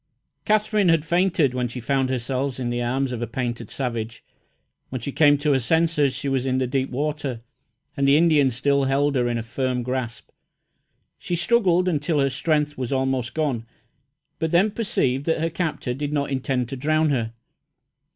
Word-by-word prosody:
Katherine 215 -2 +2
had 165 -2 +3
fainted 170 -5 +2
when 125 -1 -1
she 120 +2 -7
found 135 +2 0
herself 130 +1 -2
in 120 -2 -2
the 120 0 -1
arms 130 +2 -1
of 120 -2 -4
a 120 - -2
painted 120 -1 -4
savage. 115 -3 -4 0.7
When 130 - -4
she 130 +5 -5
came 145 0 +5
to 145 +1 +1
her 135 - +3
senses 150 +1 +1
she 140 - -4
was 135 -1 0
in 130 0 +1
the 130 - +1
deep 130 +1 -1
water, 140 -3 -3 0.5
and 140 -2 +1
the 140 +1 +6
Indian 155 -4 +4
still 140 +3 +1
held 140 +2 +1
her 125 -2 +2
in 120 -1 -1
a 115 - -3
firm 125 +1 -2
grasp. 125 -2 -4 0.9
She 175 - -2
struggled 185 -1 +2
until 150 -2 0
her 135 -1 +2
strength 150 0 0
was 125 -1 -3
almost 130 -3 -1
gone, 135 -8 -1 0.7
but 160 - 0
then 185 +6 +3
perceived 140 - -1
that 160 - +1
her 165 +1 -1
captor 150 -6 -2
did 145 +3 -4
not 140 -1 -1
intend 130 -2 -1
to 135 - -4
drown 155 +3 +1
her. 115 -4 -1
135 Hz, 185 wpm, -23 LUFS, 125-155 Hz, 0.9 s, the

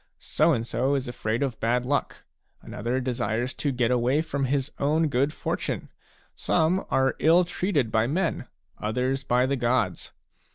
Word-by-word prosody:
So - - +1
and 115 - 0
so 130 +5 0
is 135 -2 -2
afraid 120 0 -2
of 130 -5 -3
bad 120 +2 +1
luck; 145 +2 -2 0.4
another 120 +5 -3
desires 125 0 -2
to 145 - -2
get 125 -2 +1
away 125 +5 +2
from 140 -3 -2
his 135 +2 -1
own 155 +3 +2
good 140 +3 +1
fortune. - - -3 0.5
Some 175 +4 +1
are 135 0 +2
ill 170 +3 +5
treated 170 - -1
by 110 +1 +2
men, 170 +5 -1 0.3
others 125 +5 -1
by 125 -1 +2
the 140 +1 0
gods. 120 -6 0
130 Hz, 160 wpm, -26 LUFS, 120-145 Hz, 0.5 s, ill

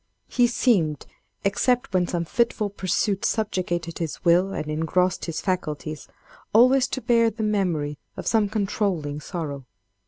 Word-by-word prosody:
"He 245 -1 +3
seemed, 185 - +1 0.4
except 245 +4 +1
when 180 -1 +2
some 170 -1 -2
fitful 215 +1 0
pursuit 195 +1 -1
subjugated 175 -6 -1
his 165 +1 -5
will 180 +3 +4
and 155 - -3
engrossed 165 +4 0
his 165 -2 -4
faculties, 155 -5 -3 0.5
always 255 +4 +6
to 260 - -4
bear 230 -2 +3
the 220 0 -5
memory 175 -9 0 0.2
of - - -6
some 220 -3 +2
controlling 195 -8 -1
sorrow. 145 -5 -5
185 Hz, 135 wpm, -24 LUFS, 160-220 Hz, 0.5 s, always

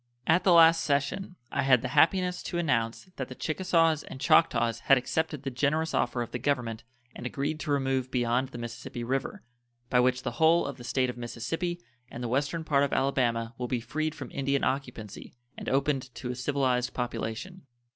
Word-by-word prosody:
At 175 +2 +3
the 190 - +4
last 165 -1 +7
session 145 +7 -1 0.2
I - - 0
had 130 -3 +4
the 125 - -2
happiness 180 +6 +3
to 175 - -4
announce 145 0 -1
that 130 - -3
the 130 - -9
Chickasaws 165 -1 +1
and - - -10
Choctaws 115 -3 +3
had 135 - +6
accepted 150 +3 -2
the 135 - -3
generous 150 +5 0
offer 120 0 0
of 115 - -10
the 120 - -3
Government 120 -4 -1 0.3
and 125 - -5
agreed 145 +4 -3
to 155 - -3
remove 135 -2 0
beyond 125 +1 0
the 125 - -9
Mississippi 120 +1 -6
River, 135 - -3 0.5
by 125 - +4
which 125 +1 +2
the - - -2
whole 165 +2 +5
of 140 -2 -5
the 120 - -10
State 130 0 0
of 120 - -15
Mississippi 165 +9 -3 0.3
and 120 - -7
the - - -1
western 140 +6 -1
part 140 -3 +2
of 140 - 0
Alabama 120 -4 0
will 125 - -2
be 125 -1 -1
freed 155 +6 -3
from - - -8
Indian 140 0 0
occupancy 125 -7 -4 0.2
and - - -5
opened 135 -1 0
to 125 - -4
a - - -5
civilized 125 -1 0
population. 120 +8 -4
135 Hz, 195 wpm, -28 LUFS, 125-155 Hz, 0.5 s, last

